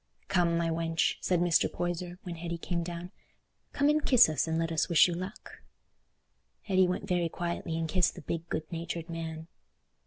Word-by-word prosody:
"Come, 170 -2 +2
my 165 -1 0
wench," 165 0 0
said 180 -2 +1
Mr. 175 -1 +3
Poyser, 175 0 -3
when 180 - -5
Hetty 170 0 -4
came 170 +1 -2
down, 170 +1 -6 0.6
"come 285 - +2
and 300 0 +3
kiss 240 -9 +6
us, 155 +1 0
and 160 0 0
let 165 0 -1
us 160 +2 0
wish 170 0 +6
you 175 - -2
luck." 185 +3 -7 1.0
Hetty 190 -2 +3
went 180 +2 -3
very 175 -3 +1
quietly 170 -1 -3
and 165 0 -1
kissed 180 +2 +2
the - - -9
big 165 +3 -4
good 155 - -2
natured 170 0 -5
man. 160 -1 -5
170 Hz, 185 wpm, -30 LUFS, 165-180 Hz, 1.0 s, kiss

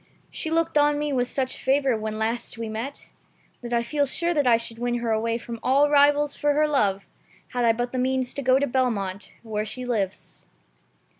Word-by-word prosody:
She 315 - -5
looked 330 -1 +1
on 295 0 +3
me 295 -1 -2
with 250 -2 +1
such 260 0 -2
favor 270 -1 +2
when 215 0 -4
last 225 +1 -2
we 230 0 -4
met, 225 +6 -6 0.5
that 240 -1 -7
I 235 0 +1
feel 285 +4 0
sure 340 +6 0
I 250 -6 +4
should 230 0 -6
win 240 0 -1
her 235 -1 -1
away 230 +1 0
from 235 -1 -8
all 280 +3 +3
rivals 290 0 +4
for 295 0 +1
her 305 +1 +3
love 200 -10 +1 0.4
had 245 -1 -1
I 230 - +6
but 240 +2 -2
the 255 - -2
means 255 0 0
to 280 - -4
go 260 0 +4
to 280 - +1
Belmont, 220 -7 -1
where 215 -2 -2
she 250 +4 -6
lives." 210 -6 -3
250 Hz, 205 wpm, -25 LUFS, 230-285 Hz, 0.5 s, I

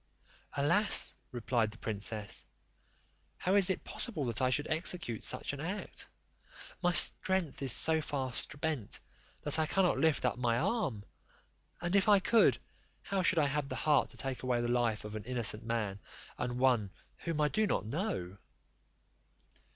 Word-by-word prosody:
"Alas," 170 +10 +4 0.2
replied 120 -2 -1
the 110 - -13
princess, 105 -1 -4 0.9
"how 185 - -1
is 200 -2 +6
it 190 - -1
possible 165 - -2
that 120 +1 -3
I 130 - +2
should 145 +3 -1
execute 160 - -2
such - - -2
an 140 - -7
act? 185 +7 -6 0.7
My 175 -1 +2
strength 175 -1 +5
is 135 -2 0
so 160 +6 +3
far 135 -4 -4
spent 150 -7 -3 0.4
that 150 +2 +2
I 155 - +1
cannot 190 0 +1
lift 160 -4 +1
up - - -1
my 120 -2 0
arm; 130 - -2 0.8
and 175 +3 -1
if 200 +1 +3
I 205 - +7
could, 225 +4 +3 0.5
how 195 -1 -2
should 180 0 +2
I 155 - +3
have 140 0 -2
the - - -4
heart 150 -2 +2
to - - -9
take 135 -2 -3
away 125 -2 -1
the 120 - -2
life 120 -3 -1
of 105 0 -7
an 110 - -6
innocent 115 -3 +1
man, 110 -4 -3 0.4
and 125 0 -4
one 125 -6 +2 0.3
whom 165 -3 -4
I 150 - +3
do 215 +4 0
not 110 - -1
know?" 110 - -4
140 Hz, 165 wpm, -32 LUFS, 115-170 Hz, 0.9 s, I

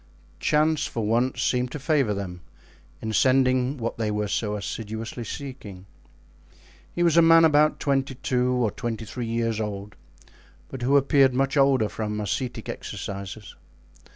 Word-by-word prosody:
Chance 155 +1 +2
for 115 -2 -3
once 120 +4 +1
seemed 125 -1 0
to - - -3
favor 145 -5 +1
them 90 -3 -6 0.6
in 110 0 -3
sending 130 +2 +3
what 115 -1 -4
they 110 -2 0
were 105 0 -1
so 105 0 -1
assiduously 110 +3 -5
seeking. 110 -8 -8 1.1
He 175 - -1
was 170 -1 +3
a - - +8
man 165 0 +7
about 150 -1 +3
twenty 135 -2 0
two 125 -1 0
or 120 -4 +1
twenty 115 0 -4
three 120 +2 -5
years 115 -1 -1
old, 100 -1 -5 0.7
but 130 - -7
who 135 +4 +4
appeared 135 -2 +4
much 135 +2 +1
older 135 -5 +4
from 105 0 -4
ascetic 120 +4 -3
exercises. 100 +1 -7
125 Hz, 150 wpm, -25 LUFS, 105-135 Hz, 1.1 s, a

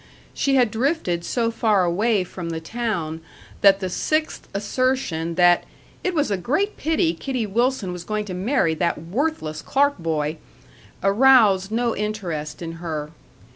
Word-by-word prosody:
She 275 -1 +1
had 245 -4 +3
drifted 225 - 0
so 230 +4 0
far 215 -5 +2
away 200 +4 +1
from 175 -1 -7
the 165 -1 -3
town 165 -5 -3 0.4
that 195 0 +6
the 185 - -1
sixth 310 - -1
assertion 200 -6 -1
that 175 0 +5 0.4
"it 365 -1 -1
was 295 -8 +1
a 200 - +1
great 305 - 0
pity 310 - +1
Kitty 245 +7 -3
Wilson 230 -2 0
was 175 -1 -7
going 215 +2 -2
to 190 - -6
marry 185 - +1
that 170 +1 0
worthless 170 - -2
Clark 285 -3 +1
boy" 155 -2 -1 0.7
aroused 200 -3 +5
no 235 +1 0
interest 180 -8 -4
in 165 - -4
her. 155 -3 -4
200 Hz, 150 wpm, -23 LUFS, 170-250 Hz, 0.7 s, that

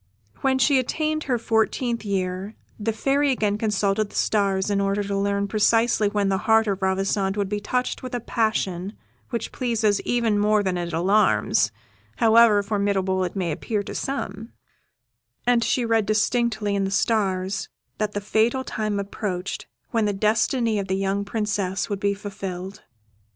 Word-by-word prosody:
When 265 -1 +1
she 265 +2 +4
had 255 -1 0
attained 310 0 -1
her 255 -3 +1
fourteenth 230 +1 0
year 190 0 -2 0.2
the 220 +2 0
Fairy 275 +6 +1
again 210 -5 0
consulted 210 -1 0
the - - -14
stars, 200 -1 +1
in 200 -1 +1
order 200 +1 0
to 200 0 -3
learn 200 0 0
precisely 220 +1 +3
when 205 -1 0
the 190 -1 +1
heart 225 0 +5
of 200 -2 -2
Ravissante 195 +1 0
would 200 -2 -1
be 210 0 -1
touched 250 +5 -2
with 255 -1 -5
a - - -1
passion 205 -5 -1 0.4
which 235 -2 -3
pleases 225 -5 0
even 230 -4 +1
more 210 0 +3
than 185 -2 0
it 175 -1 -3
alarms, 190 +6 +2 0.4
however 225 -2 +5
formidable 200 -2 0
it 180 - -4
may 180 -4 -1
appear 205 +7 -2
to - - -7
some; 225 -5 -4 0.9
and 240 -1 +3
she 245 0 +1
read 225 -2 +2
distinctly 215 -1 +1
in 200 - +1
the 195 - -1
stars 195 -2 0 0.3
that 210 -1 -1
the 205 - -2
fatal 225 +5 +1
time 215 -4 -2
approached 195 -2 -4 0.2
when 225 -2 +1
the 205 - 0
destiny 220 +2 +1
of 195 - -3
the 190 - 0
young 195 +1 0
Princess 200 -2 -2
would 200 - -2
be 200 0 +1
fulfilled. 195 -1 -6
205 Hz, 165 wpm, -24 LUFS, 195-225 Hz, 0.9 s, heart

